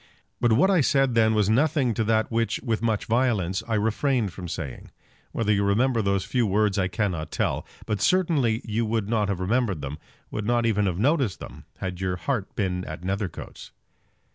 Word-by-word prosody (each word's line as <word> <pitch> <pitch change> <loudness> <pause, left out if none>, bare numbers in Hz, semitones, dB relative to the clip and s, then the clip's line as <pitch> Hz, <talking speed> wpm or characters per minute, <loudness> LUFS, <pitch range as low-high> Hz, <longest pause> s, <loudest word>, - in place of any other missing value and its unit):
But 120 -2 +3
what 170 - +4
I 180 -4 +4
said 135 -2 +2
then 110 -1 +3
was 105 -2 +2
nothing 135 +2 +2
to 110 - 0
that 110 +1 +1
which, 115 0 0
with 115 -4 -1
much 110 -3 0
violence, 110 -6 +1
I 115 - 0
refrained 110 0 0
from 90 +1 -7
saying. 80 -6 -6 0.4
Whether 105 -2 +1
you 100 0 +1
remember 115 +4 +2
those 100 -2 0
few 120 -3 +1
words 105 0 +1
I 95 - +2
cannot 90 -6 -2
tell; - - -2 0.2
but 105 -2 -2
certainly 145 - +2
you 115 +1 -1
would 110 -2 -1
not 105 -2 +1
have 100 -3 -1
remembered 100 - 0
them, 70 +2 -6 0.3
would 105 -1 -3
not 120 -1 +2
even 105 -3 +2
have 90 -2 -1
noticed 135 - +1
them, - - -10
had 90 -1 -5
your 95 -1 -1
heart 105 +1 -3
been 90 -3 -1
at 80 +2 -7
Nethercoats. 95 0 -5
110 Hz, 190 wpm, -25 LUFS, 95-120 Hz, 0.4 s, what